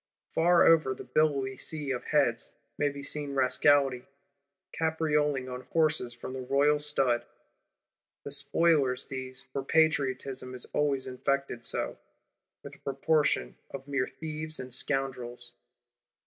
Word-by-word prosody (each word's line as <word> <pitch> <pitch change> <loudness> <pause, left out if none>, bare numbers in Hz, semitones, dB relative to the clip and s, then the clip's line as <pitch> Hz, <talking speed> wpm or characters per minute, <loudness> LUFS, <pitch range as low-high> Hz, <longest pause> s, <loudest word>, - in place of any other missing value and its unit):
Far 170 +1 +5
over 155 -5 +4
the - - -9
billowy 140 -4 +1
sea 150 -3 -3
of 125 - -3
heads, 135 -6 +1 0.2
may 145 - +1
be 140 0 -8
seen 145 -1 -2
Rascality, 130 0 +3 0.7
caprioling 150 -4 0
on 125 0 -6
horses 155 -6 +2
from 120 +2 -8
the 130 - -5
Royal 140 +3 +3
Stud. 135 -5 +1 1.0
The 140 - -6
Spoilers 140 -2 +2
these; 130 0 -6
for 135 - -2
Patriotism 135 -4 +1
is 125 - -2
always 140 -3 +1
infected 130 -1 -2
so, - - -1 0.6
with - - -9
a - - -21
proportion 140 - 0
of 135 0 -8
mere 140 -2 0
thieves 155 0 -6
and 130 -1 -6
scoundrels. 125 -3 -3
140 Hz, 130 wpm, -29 LUFS, 130-150 Hz, 1.0 s, Far